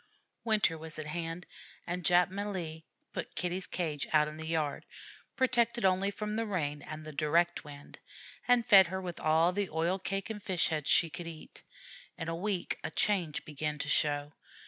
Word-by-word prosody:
Winter 210 -8 +2
was 160 0 -7
at 155 - -4
hand, 165 +2 -4 0.4
and 180 +1 -3
Jap 180 +2 +4
Malee 185 -6 -4 0.3
put - - -5
Kitty's 180 +1 -1
cage 155 -5 -2
out 150 -1 +5
in 150 0 -7
the 160 0 -6
yard, 155 -3 -1 0.5
protected 240 -4 +2
only 190 +1 +3
from 210 +1 -4
the 225 - 0
rain 150 -7 -2
and 155 +1 -8
the 155 - -6
direct 165 +4 +2
wind, 145 -1 -11 0.5
and 245 -2 +4
fed 195 -4 +8
her 190 +2 -3
with 180 -2 -6
all 160 +2 +4
the 200 0 -1
oil 170 +4 0
cake 195 +3 -3
and 210 -1 -6
fish 185 -4 +1
heads 155 -3 -2
she 165 -2 +4
could 170 +2 -6
eat. 160 -2 -10 0.6
In 165 - -4
a 165 - -1
week 190 +1 -2
a - - -2
change 180 -8 0
began 150 0 -3
to 140 0 -3
show. 145 0 +1
170 Hz, 185 wpm, -32 LUFS, 155-195 Hz, 0.6 s, fed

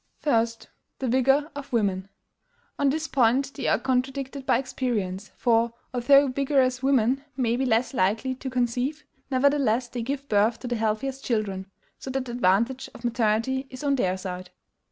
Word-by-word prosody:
1. 230 -6 +3 0.5
THE 265 - -3
VIGOR 270 +5 +2
OF 285 -1 -8
WOMEN. 200 -5 0 0.7
On 285 -1 +3
this 315 +3 -1
point 265 +2 +2
they 280 - -4
are - - +3
contradicted 265 +1 -2
by - - +4
experience; 215 -7 -3
for, 230 -1 +2 0.2
although 275 +3 +5
vigorous 260 -1 +1
women 265 0 +2
may 240 -3 +1
be 260 +1 0
less 235 +2 +1
likely 225 +4 +1
to 265 +1 -6
conceive, 255 +4 -1 0.3
nevertheless 260 -3 +2
they 240 0 -4
give 275 +3 -4
birth 215 +1 +2
to 250 - -5
the 240 - -1
healthiest 225 +5 -2
children; 200 -5 -2 0.3
so - - -7
that 265 0 -2
the 240 - -6
advantage 235 +3 +1
of - - -12
maternity 235 +3 0
is 255 +1 -9
on 285 -1 +2
their 185 -7 0
side. 185 -1 -6
250 Hz, 165 wpm, -26 LUFS, 225-270 Hz, 0.7 s, although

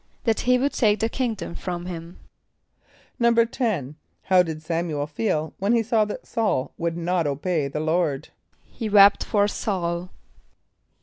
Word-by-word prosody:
=That 225 -2 +1
he 250 0 +3
would 275 +3 0
take 215 -3 +2
the 225 - 0
kingdom 230 -8 -3
from 175 -1 -5
him.= 170 -1 -7 1.0
=10.= 230 - +1 0.3
How 185 -1 +5
did 160 -3 -4
S[)a]m´u 165 -2 -2
el 145 - 0
feel 155 0 -2
when 200 +4 +1
he 230 -1 +3
saw 220 -1 +2
that 210 - -6
S[a:]ul 205 - -1
would 170 0 -2
not 170 -1 0
obey 145 +2 -1
the 145 +2 -4
Lord? 155 -3 0 0.4
=He 225 -3 -5
wept 200 -1 +6
for 205 -2 +1
S[a:]ul. 180 -4 -2
180 Hz, 150 wpm, -24 LUFS, 165-220 Hz, 1.0 s, wept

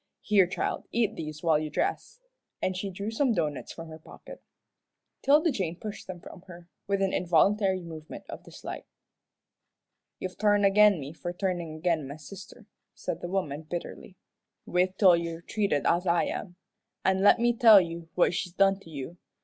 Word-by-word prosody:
Here, 200 -4 +4
child, 185 - -3
eat 225 -2 +1
these 155 0 -7
while 160 -3 +3
you 155 0 -4
dress," 395 - -2 0.4
and 185 - -1
she 195 +2 -3
drew 200 +3 -5
some 245 +1 +1
doughnuts 150 -5 -2
from 165 -1 -9
her 160 0 -10
pocket. - - -13 0.8
'Tilda 300 +4 +4
Jane 180 -9 -2
pushed 210 -1 -7
them 185 -1 -7
from 175 - -12
her, 170 -1 -12 0.2
with 200 -1 +1
an 190 - 0
involuntary 190 +3 +2
movement 160 -2 -9
of - - -9
dislike. - - -9 1.3
"You've 185 -1 -7
turned 205 -1 +3
agin 200 -1 +5
me 140 +2 -7
for 175 +1 -5
turnin' 175 -4 -3
agin 160 -3 0
my 140 - -7
sister," 195 - -12 0.3
said 170 - -5
the 175 - -5
woman, 160 -6 -2
bitterly. 175 +3 -7 0.5
"Wait 185 +1 0
till 185 -4 +7
you're 170 0 -4
treated 200 -9 -1
as 175 +2 +2
I 170 0 +3
am. 180 -3 -5 0.5
An' 190 0 +2
let 205 - +6
me 240 0 +2
tell 225 -3 +8
you 170 -2 -5
what 180 - +3
she's 175 0 -3
done 195 +1 +3
to 165 - -15
you. 155 +3 -7
180 Hz, 175 wpm, -28 LUFS, 165-200 Hz, 1.3 s, tell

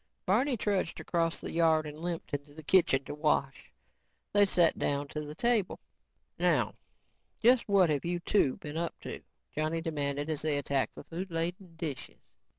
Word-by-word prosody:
Barney 245 +7 +2
trudged 200 -5 -1
across 165 -1 0
the - - -6
yard 160 -2 +3
and 150 0 -8
limped 170 -2 -4
into 145 0 -5
the 155 - -9
kitchen 150 -5 +4
to - - -5
wash. 150 -2 0 0.6
They 205 0 +6
sat 175 -3 +3
down 140 0 -1
to 150 - -4
the 150 0 -7
table. 235 -2 +1 0.6
"Now - - +2 0.7
just 240 -1 +4
what 190 -5 +5
have 145 -2 0
you 175 +1 -1
two 170 -6 +2
been 150 +1 -7
up 170 0 -3
to," - - -6 0.3
Johnny 155 +2 0
demanded 145 -3 -2
as 155 -2 -2
they 150 -2 +1
attacked 140 -1 -1
the - - -9
food 180 +4 -6
laden 170 +1 -3
dishes. 155 -5 -7
165 Hz, 170 wpm, -31 LUFS, 150-180 Hz, 0.7 s, They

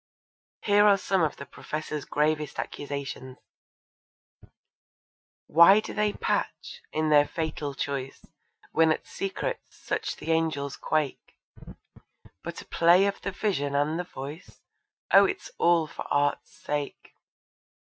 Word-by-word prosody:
Here 205 0 +4
are 200 -1 +6
some 190 -1 0
of 155 -3 +1
the 140 - -9
Professor's 150 +1 -5
gravest 150 -1 0
accusations: 140 -2 -5 2.1
Why 170 +6 +7
do 215 - -6
they 210 -1 +1
patch, 485 - -3
in 155 0 0
their 145 -1 +5
fatal 150 -3 -4
choice, 135 -1 -4 0.5
When 160 0 +4
at - - -2
secrets - - -5
such - - -3
the 165 - -4
angels 155 -4 0
quake, 155 -4 -2 1.0
But - - -7
a - - -26
play 175 +3 +4
of 200 0 -2
the - - -3
Vision 180 -8 -1
and 150 +4 +1
the - - -1
Voice? 145 -1 -9 0.5
Oh, - - +9
it's - - -4
all 170 -2 +4
for 155 - -9
Art's 145 0 +1
sake. 145 -1 -5
155 Hz, 130 wpm, -27 LUFS, 145-180 Hz, 2.1 s, Oh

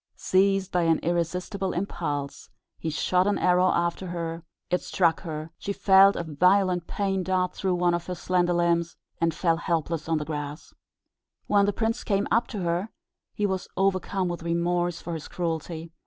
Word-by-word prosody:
Seized 195 0 +2
by 180 - +2
an 165 -1 +3
irresistible 180 +3 -1
impulse, 150 -6 -4 0.3
he 165 - -3
shot 180 +4 +1
an 205 - +2
arrow 180 0 +3
after 170 +2 -1
her; 165 -1 -4 0.3
it 180 - +2
struck 170 -3 +1
her, 155 -2 -6
she 200 - -3
felt 195 0 +6
a - - -2
violent 180 +3 +2
pain 195 -2 -1
dart 185 0 0
through 185 -2 -1
one 175 0 +2
of 175 0 -2
her 180 - -3
slender 180 0 +1
limbs, 170 -1 +1 0.2
and 165 0 +2
fell 165 +1 +1
helpless 165 -2 -2
on 165 - +2
the 150 - -3
grass. 150 0 -6 0.7
When 200 -1 +3
the - - +3
prince 225 +3 -1
came 200 -1 0
up 230 +2 +3
to 210 -5 -5
her, 175 +4 -1 0.5
he 210 - 0
was 190 -2 -2
overcome 190 0 +1
with 175 -1 -4
remorse 170 +1 0
for 170 - -6
his 160 -2 -6
cruelty. 165 -1 -4
175 Hz, 175 wpm, -26 LUFS, 165-190 Hz, 0.7 s, felt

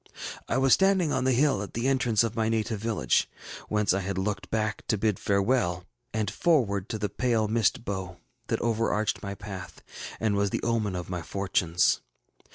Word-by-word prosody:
ŌĆ£I 130 - +2
was 135 0 +5
standing 190 -5 +3
on 130 - 0
the 130 - +4
hill 130 -3 +3
at 100 - -7
the 120 +3 0
entrance 125 -5 +3
of 115 -1 -2
my 110 -1 +1
native 110 -1 -1
village, 110 0 +1 0.4
whence 105 -3 +2
I 95 - +1
had 100 0 -3
looked 100 +1 -2
back 110 0 -1
to 110 - +1
bid 105 -1 0
farewell, 100 -3 +1 0.3
and 110 -2 -1
forward 115 - +1
to 110 - -2
the 105 0 -1
pale 115 +1 0
mist 115 +1 +1
bow 95 -3 -4 0.3
that - - 0
overarched 115 -2 0
my 100 -1 -5
path, 95 -2 -8 0.4
and 110 -2 +1
was 100 0 +2
the - - -3
omen 110 -5 0
of 90 -1 -4
my 90 -1 -2
fortunes. 90 -2 +1
110 Hz, 185 wpm, -27 LUFS, 100-115 Hz, 0.4 s, was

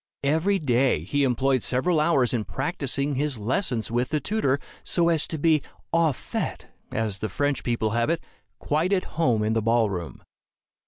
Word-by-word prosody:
Every 160 +8 +2
day 130 - +2
he 140 +11 0
employed 130 0 +2
several 155 +9 +1
hours 145 -6 +3
in 115 -3 0
practicing 140 -1 -2
his 140 -1 -1
lessons 115 - -1
with 120 +2 0
the 155 - 0
tutor, 145 -9 +1 0.3
so 170 -1 +2
as 160 -2 +3
to 160 - -3
be 155 0 +3 0.3
au 165 -2 +4
fait, 130 - -4 0.3
as 110 -3 -2
the 110 - -3
French 145 +7 -1
people 115 -3 0
have 115 +4 +1
it 165 0 0 0.3
quite 160 +6 0
at 185 - +2 0.2
home 115 -8 +3
in 110 +1 +1
the 115 - +1
ball 115 -1 +2
room. 85 -4 -6
135 Hz, 175 wpm, -25 LUFS, 115-155 Hz, 0.3 s, au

